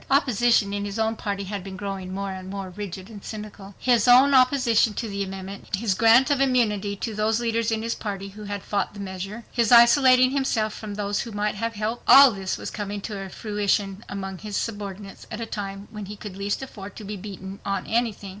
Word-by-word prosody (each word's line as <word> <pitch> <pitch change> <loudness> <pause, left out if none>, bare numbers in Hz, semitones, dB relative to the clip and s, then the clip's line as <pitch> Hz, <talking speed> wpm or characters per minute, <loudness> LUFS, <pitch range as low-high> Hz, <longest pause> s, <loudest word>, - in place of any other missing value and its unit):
Opposition 240 -6 +3
in 205 0 -2
his 205 +1 -4
own 225 0 +1
party 200 -2 -3
had 195 0 -5
been 190 0 -8
growing 195 -2 -5
more 195 +1 -3
and 185 0 -7
more 195 -1 -5
rigid 190 -1 -7
and 210 -3 -11
cynical. 210 -2 -8
His 245 -3 +2
own 260 +3 +7
opposition 255 -4 +4
to 230 - -3
the 200 -1 -3
amendment, 195 +1 -5
his 205 0 0
grant 230 +7 +5
of 280 -1 +2
immunity 215 -6 +1
to 220 +3 -4
those 215 +2 +1
leaders 230 -1 0
in 220 -1 -1
his 230 0 -1
party 195 -2 -5
who 210 +2 -10
had 205 -1 -5
fought 205 0 -2
the - - -9
measure, 195 +3 -6
his 235 -2 +1
isolating 255 +2 +7
himself 230 -6 0
from 210 -2 -7
those 205 0 -1
who 230 - -4
might 210 0 -1
have 230 +2 -3
helped—all 240 +5 +6
this 195 -3 -3
was - - -6
coming 205 -1 -4
to 195 -2 -6
fruition 205 0 -1
among 195 -2 -5
his 210 -1 -4
subordinates 200 -2 -6
at 215 - -6
a 230 - -3
time 200 -2 -6
when 210 -3 -7
he 210 - -7
could 205 -2 -9
least 200 +5 -2
afford 205 -6 -9
to 215 - -9
be 210 +1 -5
beaten 195 0 -8
on 195 - -2
anything. 225 -4 -1
210 Hz, 210 wpm, -24 LUFS, 195-230 Hz, -, own